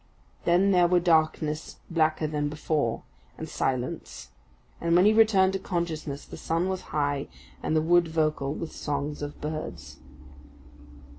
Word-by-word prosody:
Then 185 +3 +4
there 180 -2 +5
were 180 0 +4
darkness 155 -2 +1
blacker 155 -1 +2
than 150 -1 -1
before, 150 -5 -1 0.3
and 160 - -6
silence; 130 -4 -3 0.5
and 170 0 +2
when 180 +2 +6
he 215 - +6
returned 205 -4 +5
to 195 - -1
consciousness 160 -6 -3
the - - -10
sun 165 +3 -1
was 190 -1 -2
high 145 -2 -1 0.3
and 155 - -1
the 155 - +3
wood 175 +1 +4
vocal 155 -3 0
with 160 +2 -5
songs 145 0 -3
of 145 0 -6
birds. 155 +1 -6
160 Hz, 145 wpm, -27 LUFS, 150-175 Hz, 0.5 s, when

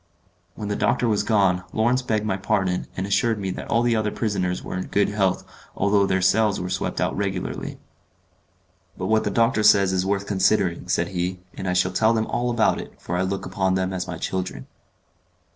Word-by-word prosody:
When 105 - -5
the 105 - -1
doctor 120 +2 +1
was 105 -2 +2
gone, 95 -5 +2
Lawrence 120 +4 +2
begged 110 -4 -1
my 105 - 0
pardon, 95 -2 -1
and 95 - -1
assured 110 +3 +1
me 95 -2 -3
that - - -6
all 115 +2 +2
the 120 -1 +2
other 110 -1 0
prisoners 95 -5 -2
were - - -5
in 95 - -3
good 100 - +1
health 95 -3 0 0.3
although 100 -1 +2
their 95 -1 +1
cells 105 +1 +3
were 90 0 -4
swept - - -2
out - - 0
regularly. - - -3 1.2
"But 95 - -4
what 110 0 +2
the - - +1
doctor 115 -1 +2
says 100 -2 +5
is 90 -1 +1
worth 100 +1 -1
considering," 95 -3 +1
said 85 - 0
he, 90 0 -3
"and 95 - -6
I 90 - +1
shall 90 +1 +2
tell 110 +4 +3
them 110 -1 +1
all 120 +2 -1
about 115 -2 +2
it, - - -13
for 90 - -4
I 90 - +1
look 95 +1 -2
upon 95 -1 0
them 95 0 -1
as 90 0 -3
my 90 -2 -5
children." 95 +2 -4
100 Hz, 210 wpm, -23 LUFS, 95-110 Hz, 1.2 s, says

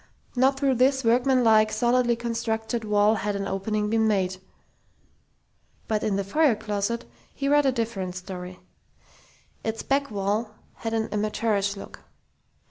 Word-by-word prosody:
Not 265 +2 +3
through 275 -2 +2
this 265 +1 +3
workmanlike, 230 -2 +4
solidly 240 +1 +2
constructed 230 0 -2
wall 210 0 +3
had 205 -1 -2
an 195 0 -3
opening 210 +2 -1
been 220 +1 +2
made.... 190 -3 0 1.5
But 215 -1 0
in 205 - 0
the 200 - 0
foyer 275 +5 +3
closet 210 +2 -2 0.3
he 275 - -2
read 290 0 +4
a - - +4
different 220 -7 -3
story. 180 -1 -7 1.0
Its 225 0 -3
back 280 +1 0
wall 210 +2 -2 0.2
had 225 0 -3
an 220 0 0
amateurish 210 -1 0
look. - - -10
220 Hz, 135 wpm, -25 LUFS, 205-240 Hz, 1.5 s, workmanlike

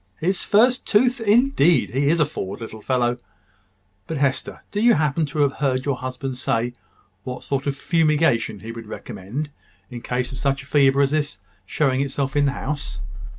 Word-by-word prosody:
"His 185 +4 +1
first 245 +5 +3
tooth? 245 +4 +3
Indeed! 215 - +3
He 140 +2 +1
is 165 +3 +3
a 150 - +5
forward 100 -9 -5
little 110 -1 -8
fellow. 120 0 +1 0.9
But, 160 - -3
Hester, 140 -1 -1
do 205 - -1
you 240 +1 +6
happen 150 0 +1
to 150 +1 -2
have 140 -1 0
heard 130 -2 0
your 140 -3 0
husband 130 0 -5
say 120 -2 0 0.5
what 125 0 -6
sort 140 0 -2
of 140 - 0
fumigation 155 - +1
he 115 - -6
would 115 -1 -9
recommend 120 +8 -6 0.4
in 120 -1 -7
case 125 +1 -2
of 130 - -7
such 140 -1 0
a - - -15
fever 140 -1 +4
as 140 - +1
this 150 -9 -1 0.3
showing 135 0 +1
itself 140 0 -2
in 145 0 +3
the 140 - +1
house?" 140 0 -4
140 Hz, 185 wpm, -22 LUFS, 125-155 Hz, 0.9 s, you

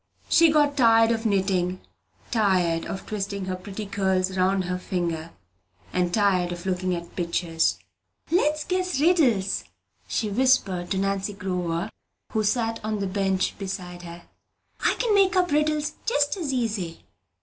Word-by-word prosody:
She 335 -1 +6
got 295 -2 +3
tired 225 -3 +5
of 225 0 0
knitting, 185 -2 0 0.5
tired 185 -7 +2
of 195 - -6
twisting 200 -2 -3
her 185 0 -2
pretty 195 +3 -7
curls 190 -1 0
round 190 +1 +2
her 180 0 -3
finger, 170 -3 -3 0.6
and 180 -1 +1
tired 185 -3 +2
of 175 0 -6
looking 185 -1 0
at 170 0 -8
pictures. 170 -2 0 0.5
"Let's 305 -3 +2
guess 365 -4 -1
riddles," 265 - +3 0.4
she 220 - -1
whispered 200 -7 +2
to 195 - -1
Nancy 195 +1 -1
Glover, 180 0 -3 0.4
who 220 - 0
sat 225 +1 0
on 215 0 -1
the 200 - -2
bench 190 0 0
beside 185 -3 -5
her. 170 0 -10 0.6
"I - - +3
can 475 -4 +1
make 395 -1 +4
up 360 -3 +2
riddles 300 0 +1
just 290 -8 +2
as 330 -8 -3
easy! 210 -10 -2
195 Hz, 150 wpm, -25 LUFS, 180-250 Hz, 0.6 s, She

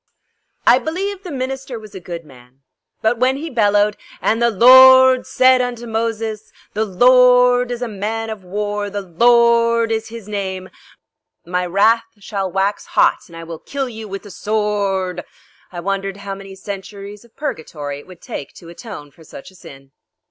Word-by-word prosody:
I 245 - +6
believe 380 +6 -4
the 375 - -9
minister 265 -1 -4
was 215 -2 -12
a 190 - -7
good 170 -2 -8
man, 125 -1 -19 0.4
but 225 +1 +1
when 260 +2 +2
he 320 +2 -6
bellowed: 205 -3 +2 0.2
"And 225 +2 0
the 235 - +4
Lorrrrd 260 +3 +7
said 255 0 +4
unto 240 -1 -4
Moses, 225 -1 -3 0.2
the 220 +1 0
Lorrrd 250 +3 +5
is 245 0 -4
a - - -2
man 220 +2 -4
of 210 -3 -8
war; 205 +2 -3
the 200 0 -5
Lorrrd 235 +4 +3
is 220 0 -2
his 230 -2 -10
name. 190 -3 -5 0.7
My 180 +1 -2
wrath 220 +5 +3
shall 195 -2 -4
wax 195 +2 -1
hot - - +4
and 170 - -13
I 165 - -8
will 165 -1 -8
kill 275 -1 -4
you 220 -2 -8
with 195 0 -7
the 205 - -11
sworrrrd!" 200 -3 -2 0.5
I 175 - -7
wondered 195 +1 -3
how 200 -1 -6
many 195 0 -10
centuries 200 +1 -8
of 235 - -23
purgatory 150 - -5
it - - -16
would 180 -2 -15
take 140 - -7
to 170 - -13
atone 170 - -10
for 160 - -19
such 155 - -12
a - - -21
sin. 135 -6 -14
210 Hz, 175 wpm, -18 LUFS, 190-240 Hz, 0.7 s, Lorrrrd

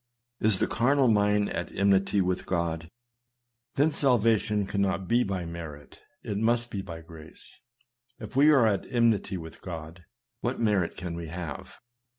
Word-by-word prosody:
Is 110 -3 +3
the - - +1
carnal 135 +3 +2
mind 105 -1 +2
at 90 - -4
enmity 100 +1 +3
against 90 0 -1
God? 85 -2 -2 0.9
Then 150 +3 +3
salvation 115 -7 +2
cannot 95 -1 -1
be 120 +1 +3
by 95 -4 -3
merit; 80 -4 -9 0.2
it 100 - -3
must 120 +1 +1
be 100 - -3
by 85 -4 -8
grace. 80 -1 -13 0.6
If - - -10
we 145 +3 +6
are 135 -6 +5
at 100 -3 0
enmity 115 -5 +2
with 80 -2 -10
God, 80 -1 -8 0.3
what 120 +2 -2
merit 105 -7 +1
can 90 -2 -5
we 85 -1 -6
have 85 -3 -7
100 Hz, 155 wpm, -27 LUFS, 85-115 Hz, 0.9 s, we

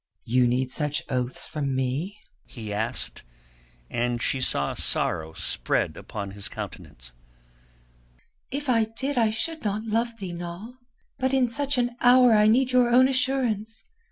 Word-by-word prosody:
"You 125 +1 +2
need 125 +1 0
such 150 +1 +2
oaths 125 -1 +2
from 140 -4 -3
me?" 135 +10 -2 0.3
he 110 -4 -7
asked, 110 +4 -3 0.6
and 120 - -1
she 130 +2 0
saw 70 - +1
sorrow 80 0 -1
spread - - -1
upon 100 -2 -7
his 100 0 -5
countenance. - - -9 1.4
"If 290 +2 -5
I 230 -3 +3
did 265 +6 -4
I 225 -2 +3
should 315 +9 -1
not 210 0 -2
love 230 +1 -1
thee, 190 -5 -6
Noll. 175 +7 -7 0.5
But 260 0 +1
in 260 -2 +3
such 280 +3 +1
an 245 -1 -1
hour 250 -1 +6
I 210 0 +5
need 255 +4 +3
your 250 -1 +4
own 255 +2 +6
assurance. 255 -5 0
215 Hz, 150 wpm, -25 LUFS, -, 1.4 s, hour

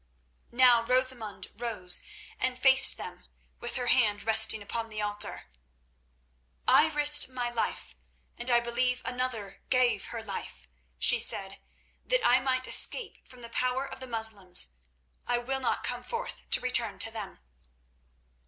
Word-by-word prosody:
Now 245 -1 +4
Rosamund 250 -4 -1
rose 210 -7 +1 0.4
and 255 -1 -2
faced 265 +1 +5
them, - - -10 0.3
with 240 - -5
her 250 - -2
hand 220 -4 +2
resting 220 -1 +3
upon 225 +2 -5
the 215 -1 -7
altar. 205 0 -3 1.2
"I 315 - +5
risked 295 -2 +3
my 245 -2 -4
life 235 -2 -4 0.4
and 240 +1 +2
I 240 -1 +3
believe 250 +1 -1
another 250 -6 -5
gave 255 -1 +1
her 230 -2 -7
life," 190 - -8 0.3
she - - +5
said, 195 0 0 0.4
"that - - 0
I 245 +1 +4
might 255 0 -2
escape 480 -4 +1
from 250 -1 -15
the 235 - -9
power 255 +3 -1
of - - -10
the 260 - -8
Moslems. 220 - +1 0.6
I 245 - +1
will 265 +3 -3
not 260 - -2
come - - -1
forth 475 0 -7
to - - +5
return 235 -4 0
to 225 - +2
them." 215 -3 -8
240 Hz, 145 wpm, -28 LUFS, 220-255 Hz, 1.2 s, faced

